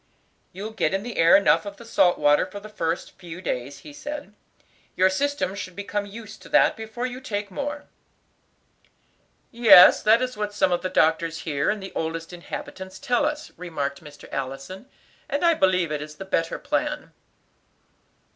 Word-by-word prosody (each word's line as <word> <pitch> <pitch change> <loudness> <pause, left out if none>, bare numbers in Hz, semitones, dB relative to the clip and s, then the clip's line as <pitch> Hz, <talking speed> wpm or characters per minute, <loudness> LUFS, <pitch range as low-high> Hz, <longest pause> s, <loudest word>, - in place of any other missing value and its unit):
"You 205 +4 -6
get 195 -5 0
in 195 - -2
the 240 0 -6
air 165 +3 +7
enough 200 - +3
of 200 -1 -8
the 235 - -12
salt 180 -5 +3
water 145 0 +4
for 200 +2 -8
the 215 +1 -11
first 170 -5 -3
few 170 -1 -9
days," 140 -6 -4
he 295 - -12
said. 290 -4 -7 0.6
"Your 185 +1 +4
system 285 -3 -1
should 185 -3 -7
become 205 0 -3
used 215 +1 -10
to - - -13
that - - +4
before 225 +2 -5
you 255 +1 -5
take 205 -5 -4
more." 290 +6 -4 1.7
"Yes, 230 -6 +8
that 220 +2 +5
is 255 0 -3
what 210 -1 -4
some 190 - +2
of 175 - +1
the 185 - -2
doctors 165 -1 +1
here, 145 -3 -1
and 210 -2 -2
the 190 - -8
oldest 165 +1 -4
inhabitants, 190 +2 -8
tell 270 0 +1
us," 300 0 -5
remarked 145 -5 -4
Mr. 150 -1 -13
Allison, 135 - -5 0.4
"and 285 +4 0
I 335 - +6
believe 185 - +2
it 150 -1 -2
is 150 0 -8
the 195 - -8
better 165 -3 -1
plan." - - -2
190 Hz, 175 wpm, -24 LUFS, 165-225 Hz, 1.7 s, Yes